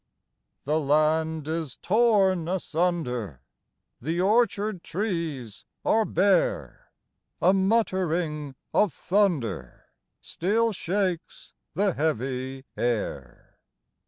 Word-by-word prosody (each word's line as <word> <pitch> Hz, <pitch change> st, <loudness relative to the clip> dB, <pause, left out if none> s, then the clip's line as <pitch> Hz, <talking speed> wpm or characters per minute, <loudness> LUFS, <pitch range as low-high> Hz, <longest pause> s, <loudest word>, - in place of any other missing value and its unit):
The 150 Hz, +3 st, +1 dB
land 155 Hz, +1 st, +1 dB
is 160 Hz, -4 st, -3 dB
torn 195 Hz, -5 st, +3 dB
asunder, 155 Hz, -, -2 dB, 0.6 s
The 165 Hz, +7 st, -2 dB
orchard 210 Hz, -1 st, +2 dB
trees 165 Hz, -, -4 dB, 0.2 s
are 220 Hz, 0 st, +3 dB
bare; 190 Hz, 0 st, +1 dB, 0.5 s
A 185 Hz, +3 st, +4 dB
muttering 180 Hz, -8 st, 0 dB, 0.2 s
of 205 Hz, -8 st, +3 dB
thunder 165 Hz, -, -1 dB, 0.3 s
Still 225 Hz, +6 st, 0 dB
shakes 185 Hz, -2 st, -3 dB, 0.2 s
the 200 Hz, -1 st, +2 dB
heavy 130 Hz, -2 st, -2 dB
air. 105 Hz, -, -3 dB
165 Hz, 80 wpm, -26 LUFS, 140-195 Hz, 0.6 s, A